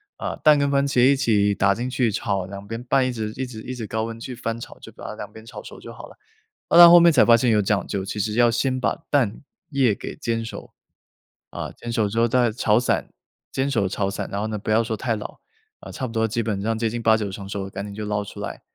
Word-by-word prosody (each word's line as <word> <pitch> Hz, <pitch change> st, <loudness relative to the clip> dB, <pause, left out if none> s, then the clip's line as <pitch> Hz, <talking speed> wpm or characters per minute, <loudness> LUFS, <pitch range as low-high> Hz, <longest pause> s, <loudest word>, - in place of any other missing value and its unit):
啊， -, -, -4 dB
蛋 150 Hz, -1 st, +5 dB
跟 140 Hz, 0 st, +1 dB
番 140 Hz, 0 st, +2 dB
茄 125 Hz, -3 st, +3 dB
一 140 Hz, +1 st, +5 dB
起 105 Hz, -5 st, +2 dB
打 100 Hz, 0 st, +2 dB
进 120 Hz, +2 st, -3 dB
去 125 Hz, -3 st, 0 dB
炒， 100 Hz, -3 st, -2 dB
2 100 Hz, +1 st, -9 dB
边 115 Hz, +2 st, -6 dB
拌 130 Hz, +1 st, +2 dB
一 130 Hz, -, -1 dB
直 110 Hz, -3 st, -4 dB
一 130 Hz, -, -2 dB
直 115 Hz, -3 st, -9 dB
一 130 Hz, -, -6 dB
直 115 Hz, -3 st, -5 dB
高 110 Hz, +1 st, -2 dB
温 115 Hz, 0 st, -7 dB
去 125 Hz, +2 st, -7 dB
翻 115 Hz, -1 st, -4 dB
炒， -, -, -10 dB
就 -, -, -12 dB
把 -, -, -12 dB
它 -, -, -5 dB
2 -, -, -8 dB
边 110 Hz, 0 st, -13 dB
炒 -, -, -9 dB
熟 -, -, -12 dB
就 -, -, -10 dB
好 -, -, -11 dB
了。 -, -, -17 dB, 0.5 s
啊， 170 Hz, -, +4 dB
那 170 Hz, -1 st, +12 dB
后 175 Hz, 0 st, +9 dB
面 170 Hz, 0 st, +6 dB
才 140 Hz, -, +5 dB
发 115 Hz, -1 st, +6 dB
现 120 Hz, 0 st, +2 dB
有 105 Hz, -1 st, +3 dB
讲 100 Hz, -1 st, 0 dB
究， 100 Hz, -2 st, -3 dB
其 100 Hz, +2 st, -5 dB
实 105 Hz, +1 st, -1 dB
要 120 Hz, +1 st, +4 dB
先 130 Hz, +2 st, 0 dB
把 -, -, -2 dB
蛋 120 Hz, -8 st, +1 dB, 0.3 s
液 135 Hz, -7 st, +2 dB
给 -, -, -7 dB
煎 115 Hz, -1 st, -2 dB
熟， 115 Hz, -, -9 dB, 0.8 s
啊， -, -, -6 dB
煎 120 Hz, -, -8 dB
熟 115 Hz, -3 st, +1 dB
之 115 Hz, -, -6 dB
后 115 Hz, -, +4 dB
再 120 Hz, -1 st, +2 dB
炒 110 Hz, 0 st, +2 dB
散， 125 Hz, -, -1 dB, 0.4 s
煎 135 Hz, +1 st, -1 dB
熟 100 Hz, -6 st, +1 dB
炒 100 Hz, 0 st, -2 dB
散， -, -, -5 dB
然 100 Hz, -, -2 dB
后 105 Hz, -, -2 dB
呢 110 Hz, -1 st, -3 dB
不 110 Hz, -, -7 dB
要 115 Hz, +2 st, +3 dB
说 110 Hz, -1 st, -3 dB
太 115 Hz, -1 st, -1 dB
老， 105 Hz, -, -8 dB, 0.4 s
呃， -, -, -11 dB
差 130 Hz, -, -4 dB
不 115 Hz, -, -9 dB
多 115 Hz, -1 st, +1 dB
基 115 Hz, +1 st, -2 dB
本 100 Hz, -3 st, -2 dB
上 110 Hz, +1 st, -1 dB
接 115 Hz, -1 st, 0 dB
近 120 Hz, +1 st, -4 dB
8-9 110 Hz, -3 st, +2 dB
成 100 Hz, 0 st, -8 dB
熟 100 Hz, -1 st, -5 dB
赶 95 Hz, +1 st, -6 dB
紧 100 Hz, -1 st, -8 dB
就 105 Hz, -, -5 dB
捞 105 Hz, 0 st, -1 dB
出 100 Hz, -, -10 dB
来， -, -, -6 dB
115 Hz, 290 characters per minute, -23 LUFS, 105-125 Hz, 0.8 s, 那